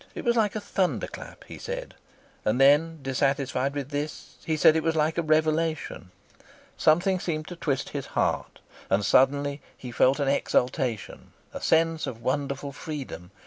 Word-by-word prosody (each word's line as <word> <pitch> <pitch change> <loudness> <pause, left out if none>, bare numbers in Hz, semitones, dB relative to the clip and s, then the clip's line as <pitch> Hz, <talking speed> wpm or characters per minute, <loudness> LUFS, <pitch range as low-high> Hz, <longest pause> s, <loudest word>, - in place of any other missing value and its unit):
It - - -6
was 235 0 +3
like 220 -3 +2
a - - -1
thunder 195 -3 -1
clap, - - -10
he - - -11
said, - - -5 0.5
and 125 - +1
then, 150 +4 +5
dissatisfied 135 0 0
with 140 -2 -4
this, 145 +1 -5
he 160 -1 -1
said 155 - +6
it 160 - +2
was 165 0 0
like 160 +2 +1
a - - +3
revelation. 155 - 0 0.7
Something 180 +4 +3
seemed 155 -3 -3
to 175 - -7
twist 140 -5 -2
his 140 -2 -5
heart, - - -1 0.3
and 100 +1 +2
suddenly 140 +4 +3 0.2
he 125 - -8
felt 130 +4 +3
an 140 - 0
exultation, 125 -4 -1 0.2
a - - -6
sense 165 0 +2
of 115 - -6
wonderful 140 +1 -2
freedom. 140 - -7
145 Hz, 165 wpm, -26 LUFS, 135-160 Hz, 0.7 s, said